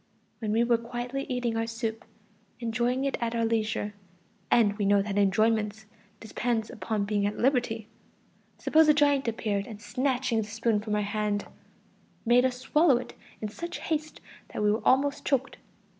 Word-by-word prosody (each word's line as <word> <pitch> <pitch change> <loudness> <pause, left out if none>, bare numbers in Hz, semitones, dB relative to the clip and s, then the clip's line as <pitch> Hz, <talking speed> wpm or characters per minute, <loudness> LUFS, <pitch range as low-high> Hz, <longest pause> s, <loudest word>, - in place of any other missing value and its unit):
When 215 -2 -2
we 225 +2 +3
were 235 -1 +3
quietly 245 +3 -4
eating 245 -3 -1
our 225 0 -1
soup, 225 0 -4 0.5
enjoying 245 +3 0
it 275 - -1
at 235 0 -1
our 230 -1 +1
leisure 220 -2 -1 0.6
(and 210 -4 +4
we - - +1
know 200 0 +4
that 200 -1 -4
enjoyment 215 +2 +2 0.3
depends 225 0 -2
upon 215 0 -2
being 205 -1 +1
at 205 - -4
liberty), 240 -4 +1 0.7
suppose 315 0 +4
a 300 - +6
giant 285 -3 +3
appeared 210 -3 -1
and 215 -3 -9
snatching 250 +2 0
the 210 - -6
spoon 225 0 0
from 210 -1 -2
our 210 - +1
hand, 205 0 -1 0.8
made 245 +2 +5
us 250 -1 0
swallow 280 +2 +3
it 250 - -7 0.3
in 215 - -3
such 340 +11 -6
haste 310 -1 -3 0.3
that - - -3
we 210 - +4
were 215 - 0
almost 280 +2 +3
choked. 270 -1 0
230 Hz, 170 wpm, -28 LUFS, 210-250 Hz, 0.8 s, a